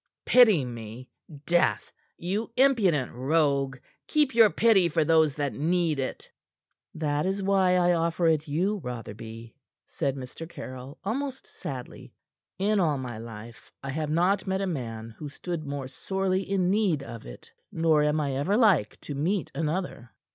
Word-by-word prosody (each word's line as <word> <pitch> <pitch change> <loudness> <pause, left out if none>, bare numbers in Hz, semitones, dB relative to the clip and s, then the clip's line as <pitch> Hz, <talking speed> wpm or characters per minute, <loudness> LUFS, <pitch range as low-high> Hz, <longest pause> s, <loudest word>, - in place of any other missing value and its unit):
"Pity 215 - +6
me? 120 +1 -8 0.4
Death! 175 +1 +1 0.3
You 195 +6 -2
impudent 205 - +3
rogue! 140 0 +1 0.3
Keep 300 -3 +2
your 225 -2 +7
pity 200 -5 +4
for 160 0 +2
those 160 -3 +4
that 145 -2 -2
need 165 -1 0
it." 130 - -5 0.6
"That 150 +1 -1
is 195 +1 -1
why 190 -2 +3
I 175 -1 +4
offer 170 +1 0
it 160 -1 +2
you, 180 +8 0
Rotherby," 115 -1 -8 0.3
said 140 -1 -2
Mr. 135 +5 -8
Caryll, 130 -1 -9
almost 265 +5 -3
sadly. - - -8 0.4
"In 205 +2 +1
all 155 -6 +2
my 125 -4 -6
life, 115 0 -10
I 135 - -4
have 155 +1 -2
not 180 +6 +1
met 190 0 0
a - - 0
man 115 -9 -4
who 150 - -6
stood 160 +1 -5
more 140 -2 -4
sorely 190 +5 -2
in 185 -2 +1
need 195 -9 +1
of 115 - -9
it, - - -12 0.2
nor 160 -2 +3
am 150 +1 +2
I 140 -3 -1
ever 185 +10 +1
like 195 - +3
to 145 - -6
meet 175 +7 -1
another." 160 -6 -3
160 Hz, 155 wpm, -27 LUFS, 135-190 Hz, 0.6 s, your